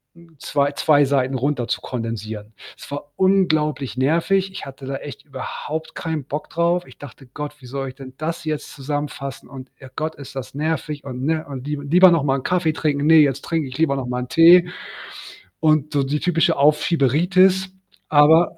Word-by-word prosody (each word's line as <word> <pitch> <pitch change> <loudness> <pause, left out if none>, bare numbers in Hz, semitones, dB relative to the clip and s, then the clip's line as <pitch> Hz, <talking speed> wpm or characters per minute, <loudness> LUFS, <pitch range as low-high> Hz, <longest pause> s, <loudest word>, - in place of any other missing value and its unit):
hm, 170 -1 -19
2- 145 0 0
2 145 0 +3
Seiten 135 -1 0
runter 130 -2 -1
zu - - -2
kondensieren. 110 -3 -6 0.2
Es - - -12
war 145 0 -6
unglaublich 155 - +1
nervig. 170 +8 +1
Ich 190 - -8
hatte 135 0 -10
da 135 0 -4
echt 145 +1 -10
überhaupt 150 +3 -6
keinen 160 -4 -3
Bock 145 +3 -6
drauf. 170 +1 0
Ich 130 - -16
dachte: 135 -1 -12
„Gott, 150 +3 -6
wie - - -14
soll 135 +1 -4
ich 130 - -12
denn 130 -2 -11
das 160 +1 -4
jetzt 155 -1 -4
zusammenfassen?“ 140 -1 -5
und 135 -1 -10
„Oh 130 - -10
Gott, 155 +1 -2
ist 140 -1 -11
das 135 -1 -6
nervig.“, 150 -1 -3
und 130 -1 -6
ne? 160 0 0
Und: 135 0 -7
„Lie 150 -1 -3
Lieber 180 +5 +6
noch 165 -4 +2
mal 135 -1 0
Kaffee 175 -1 +1
trinken. 150 -2 -1
Ne, 160 +1 +6
jetzt 140 -2 +2
trinke 160 -4 -1
ich 130 - -8
lieber 155 -4 +2
noch 125 -2 -4
mal 125 0 -2
'n 125 - -10
Tee.“, 175 +2 +7 0.9
und 155 -1 +2
so 140 - +2
die 145 +2 -1
typische 170 -1 +2
„Aufschieberitis“. 175 +6 +3 0.4
Aber 155 +3 +5
145 Hz, 190 wpm, -21 LUFS, 135-160 Hz, 0.9 s, Tee